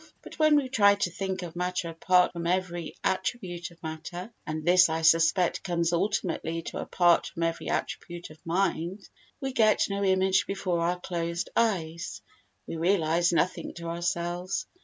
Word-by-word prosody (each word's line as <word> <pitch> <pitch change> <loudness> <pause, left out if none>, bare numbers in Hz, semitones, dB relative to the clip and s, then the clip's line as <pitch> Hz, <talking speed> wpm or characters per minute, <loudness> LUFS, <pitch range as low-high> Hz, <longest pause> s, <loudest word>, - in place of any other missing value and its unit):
But - - -12
when 310 -1 +5
we 285 -3 +2
try 200 -5 +5
to 190 -3 -1
think 190 0 -3
of 170 -1 -8
matter 180 0 -2
apart 180 +2 +3
from 170 -1 -4
every 175 -2 -2
attribute 185 -3 -2
of 170 -1 -20
matter 170 +6 -6
(and 155 0 -4
this 180 0 +6
I 160 0 -2
suspect 165 +2 +4
comes 170 -2 0
ultimately 165 -2 -1
to - - -5
"apart 175 -2 +3
from 165 - -4
every 165 0 -2
attribute 175 -1 -4
of 155 - -16
mind") 180 +2 -1 0.3
we 270 -1 -3
get 215 -3 +4
no 200 0 -1
image 190 0 +3
before 185 -3 -1
our 175 +2 0
closed 170 -1 -3
eyes—we 170 -5 -3
realise 170 -1 +2
nothing 175 +1 0
to 170 -1 -6
ourselves. 175 +2 -2
175 Hz, 160 wpm, -28 LUFS, 170-190 Hz, 0.3 s, this